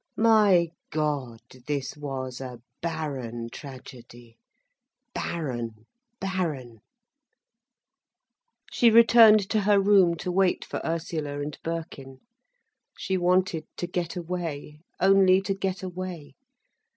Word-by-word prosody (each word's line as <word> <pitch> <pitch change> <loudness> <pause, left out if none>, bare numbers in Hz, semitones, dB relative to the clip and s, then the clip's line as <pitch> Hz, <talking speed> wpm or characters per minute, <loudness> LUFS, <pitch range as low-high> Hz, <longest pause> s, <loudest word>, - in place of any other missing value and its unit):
My 210 -6 +4 0.2
God! 145 -7 -2 0.3
this 140 -3 -3
was 135 -3 -5
a 125 -2 -7 0.2
barren 135 -8 -4
tragedy, 120 -4 -12 0.7
barren, 120 -9 -4 0.3
barren. 155 - -3 1.9
She 235 - +4
returned 225 -2 +7
to 220 - +2
her 200 0 +4
room 195 -4 +4
to 180 +2 -4
wait 185 0 +1
for - - -5
Ursula 160 -3 -3
and 145 +1 -5
Birkin. 155 -5 -6 0.8
She 190 - -2
wanted 180 -2 +1
to - - -2
get 175 0 -3
away, 165 -4 -5 0.2
only 190 0 +5
to 195 0 -2
get 195 -1 -3
away. 180 -4 -6
165 Hz, 105 wpm, -26 LUFS, 135-190 Hz, 1.9 s, returned